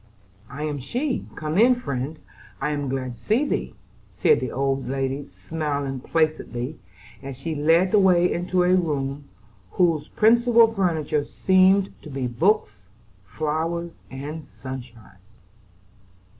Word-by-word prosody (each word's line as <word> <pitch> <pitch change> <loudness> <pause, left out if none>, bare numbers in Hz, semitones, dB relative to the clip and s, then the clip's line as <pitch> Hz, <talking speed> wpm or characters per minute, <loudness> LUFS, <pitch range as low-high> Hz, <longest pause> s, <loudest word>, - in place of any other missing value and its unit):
"I 145 +3 -6
am 150 -2 -2
she; 250 - -2
come 155 +4 -1
in, 250 +3 +6
friend; 140 - -4 0.4
I 150 +2 -1
am 145 -2 -2
glad 130 -1 -3
to 115 - -16
see 225 - +1
thee," - - -2 0.4
said 455 - +4
the - - -3
old 135 -1 -1
lady, 135 +1 -2
smiling 140 - -3
placidly, 155 -2 -1 0.4
as 135 -2 -7
she 160 +4 -4
led 165 +5 +3
the 210 - +5
way 180 -2 +4
into 180 +1 0
a 180 +1 +3
room 145 -5 -1 0.5
whose 165 -4 +2
principal 230 0 +4
furniture 160 -7 0
seemed 190 +5 +3
to 155 - -11
be 135 -2 -3
books, 125 - 0 0.4
flowers, 160 - -2 0.2
and 145 +4 -6
sunshine. 125 -7 -10
155 Hz, 130 wpm, -24 LUFS, 135-180 Hz, 0.5 s, in